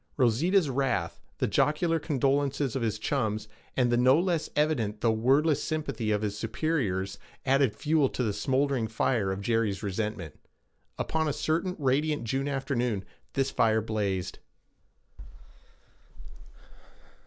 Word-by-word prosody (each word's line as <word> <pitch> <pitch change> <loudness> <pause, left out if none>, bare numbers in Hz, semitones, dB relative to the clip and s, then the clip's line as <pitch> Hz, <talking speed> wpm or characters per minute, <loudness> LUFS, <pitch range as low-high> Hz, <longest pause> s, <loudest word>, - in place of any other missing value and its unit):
Rosita's 150 - +3
wrath, 130 -11 -1 0.2
the - - +1
jocular 165 +2 +1
condolences 140 -2 0
of 135 - -1
his 110 -2 -1
chums, 110 -3 -1 0.3
and 125 -2 +3
the 120 - +3
no 130 +5 +5
less 175 -3 0
evident 120 -9 0
though 115 - +3
wordless 135 +7 +3
sympathy 155 -8 -2
of 105 0 +1
his 105 -1 -2
superiors 105 - -2 0.3
added 135 -4 +3
fuel 150 -3 +2
to 125 - -2
the 105 -3 0
smouldering 130 +2 0
fire 110 -2 0
of 95 +1 -4
Jerry's 110 -3 0
resentment. 100 -5 -4 0.6
Upon 160 0 -1
a 145 - 0
certain 170 +6 -1
radiant 145 0 +1
June 135 +5 -1
afternoon 125 -7 -1 0.3
this 135 0 0
fire 110 -1 +3
blazed. 100 -4 -2
130 Hz, 130 wpm, -28 LUFS, 110-145 Hz, 0.6 s, no